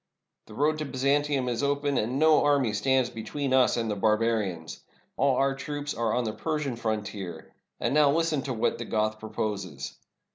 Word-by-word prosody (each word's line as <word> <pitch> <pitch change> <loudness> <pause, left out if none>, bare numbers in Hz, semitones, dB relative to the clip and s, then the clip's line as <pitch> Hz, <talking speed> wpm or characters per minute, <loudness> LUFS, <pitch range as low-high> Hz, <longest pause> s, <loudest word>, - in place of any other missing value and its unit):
The 110 - -12
road 155 +4 +1
to 155 - -2
Byzantium 140 0 +1
is 120 0 -1
open, 145 0 0
and 120 +5 -1
no 155 +1 +5
army 140 -6 +2
stands 130 +4 +2
between 130 +4 -3
us 130 -2 +4
and 115 -1 -1
the - - -1
barbarians. 105 -5 0 0.4
All 135 -1 +2
our 135 +1 +2
troops 145 +1 -4
are 115 -1 0
on 125 - +1
the 110 -2 -2
Persian 150 +1 -2
frontier. 105 -7 -4 0.3
And - - 0
now 150 -1 +5
Hsten 160 -3 +1
to 135 - -2
what 110 - 0
the 120 - -4
Goth 110 0 -1
proposes. 100 -9 -4
125 Hz, 180 wpm, -27 LUFS, 110-145 Hz, 0.4 s, no